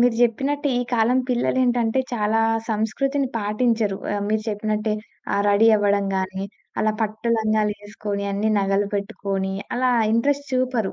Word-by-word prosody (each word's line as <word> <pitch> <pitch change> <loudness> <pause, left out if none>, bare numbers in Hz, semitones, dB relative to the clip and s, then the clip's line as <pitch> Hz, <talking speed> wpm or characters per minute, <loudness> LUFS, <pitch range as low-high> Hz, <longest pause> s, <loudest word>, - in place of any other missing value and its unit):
మీరు 245 -1 +4
జెప్పినట్టే, 275 +5 +1
ఈ - - +1
కాలం 240 +2 +3
పిల్లలేంటంటే 245 -1 +1
చాలా 220 -1 +1 0.3
సంస్కృతిని 265 +6 0
పాటించరు. 215 -1 0 0.2
ఆహ్, 205 - -1
మీరు 215 0 0
చెప్పినట్టే. 215 0 -1 0.4
ఆహ్, 200 - +2
రెడీ 205 +3 +5
అవ్వడం 200 -1 +2
గాని, 190 +1 -2 0.4
అలా 215 0 +2
పట్టు 220 +2 -3
లంగాలేసుకొని, 210 -1 -2
అన్ని 210 +2 0
నగలు 195 +1 +1
పెట్టుకొని 195 -1 -3 0.2
అలా 255 0 +2 0.2
ఇంట్రెస్ట్ 285 +5 +1
చూపరు. 255 -5 0
215 Hz, 130 wpm, -23 LUFS, 205-245 Hz, 0.4 s, రెడీ